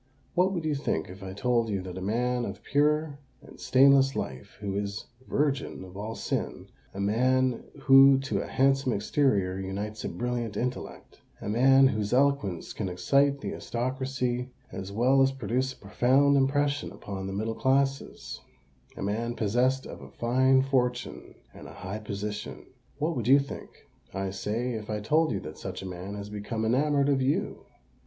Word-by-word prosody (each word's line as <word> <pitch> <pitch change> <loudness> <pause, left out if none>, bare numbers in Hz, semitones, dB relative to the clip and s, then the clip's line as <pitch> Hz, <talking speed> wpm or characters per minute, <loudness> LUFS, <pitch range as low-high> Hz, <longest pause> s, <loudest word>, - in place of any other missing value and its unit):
What 185 +2 +3
would 170 -4 -3
you 155 - +1
think 140 -9 -2
if 95 +2 -12
I 95 -1 -6
told 120 +1 +1
you 100 -3 -2
that 90 -1 -7
a 95 - -6
man 120 +5 0
of - - -6
pure 150 0 +1 0.2
and - - -15
stainless 135 0 +5
life, 65 -1 -6
who 100 -2 -4
is 100 0 -3 0.2
virgin 140 -8 -1
of 95 0 -12
all 110 +3 -5
sin,—a 100 - -5
man 125 +4 +2 0.2
who 135 -1 +8
to 135 - -1
a - - -6
handsome 135 -1 +2
exterior 100 -4 +1
unites 100 +3 -5
a - - -2
brilliant 120 -3 -3
intellect,—a 125 -4 -6
man 135 +5 +5
whose 105 -3 -2
eloquence 130 -10 +1
can 100 -4 -3
excite 140 +9 +2
the - - -4
aristocracy 125 0 -2 0.2
as 95 0 -6
well 125 +6 +3
as 135 0 +4
produce 130 +1 -2
a - - -21
profound 130 +7 +3
impression 145 +1 +1
upon 95 -1 -6
the 95 - -4
middle 110 +3 -2
classes,—a 130 - -3
man 115 +4 -2
possessed 125 +5 +1
of - - -9
a - - -11
fine 130 +2 +3
fortune 125 -2 -1 0.2
and - - -11
a - - -11
high 100 +3 -6
position,—what 105 +9 -5
would 120 -3 -3
you 135 +2 +8
think, 140 -1 -4 0.5
I 95 -1 -2
say, 110 +6 -2
if 110 -2 -6
I 105 -1 -2
told 155 +9 +2
you 95 - -1
that 75 -1 -9
such - - -6
a - - -6
man 95 +2 -6
has 100 0 -7
become 110 +2 -3
enamoured 140 +4 +2
of 135 -2 +2
you?" 135 +3 -1
125 Hz, 165 wpm, -28 LUFS, 100-135 Hz, 0.5 s, who